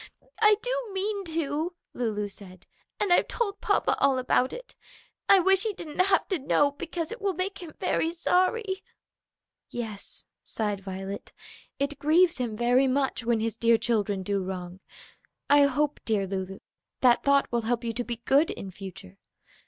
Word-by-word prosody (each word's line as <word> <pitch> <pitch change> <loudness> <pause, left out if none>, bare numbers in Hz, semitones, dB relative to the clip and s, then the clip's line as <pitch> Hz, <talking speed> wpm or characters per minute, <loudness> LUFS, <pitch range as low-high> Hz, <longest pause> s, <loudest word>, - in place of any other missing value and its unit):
"I 425 -1 +7
do - - -2
mean 395 +1 -2
to," 320 +1 -2 0.2
Lulu 215 -4 -2
said. 185 -2 -13 0.3
"And 400 -4 +3
I've - - +4
told 415 -4 -2
papa - - +2
all 275 -1 +3
about 255 0 +2
it. - - -9 0.6
I 395 - +9
wish 385 +1 +4
he 435 -1 0
didn't 325 -4 -9
have 385 +2 +3
to 375 -5 0
know, 285 +1 +2
because 330 +2 -5
it 460 - -7
will 395 -2 0
make 375 +3 -3
him 330 -3 -10
very 325 - +1
sorry." 380 +4 +1 0.9
"Yes," 220 -4 -4 0.2
sighed 210 -3 -2
Violet, 195 +1 -6 0.4
"it 280 0 -2
grieves 325 +2 +4
him 230 -4 -2
very 245 +3 +3
much 265 -1 0
when 230 -1 +1
his 225 0 -1
dear 230 0 +4
children 210 -4 0
do 200 +1 -1
wrong. 185 -1 -6 0.7
I 290 0 +7
hope, 290 +2 0
dear 210 -3 0
Lulu, 190 0 -5 0.4
that 245 -2 +5
thought 280 0 +3
will 235 0 +1
help 235 +1 -1
you 230 -1 -2
to 245 +2 -2
be 235 -1 -6
good 285 +4 +4
in 195 - -6
future. 185 - -10
270 Hz, 170 wpm, -27 LUFS, 215-355 Hz, 0.9 s, I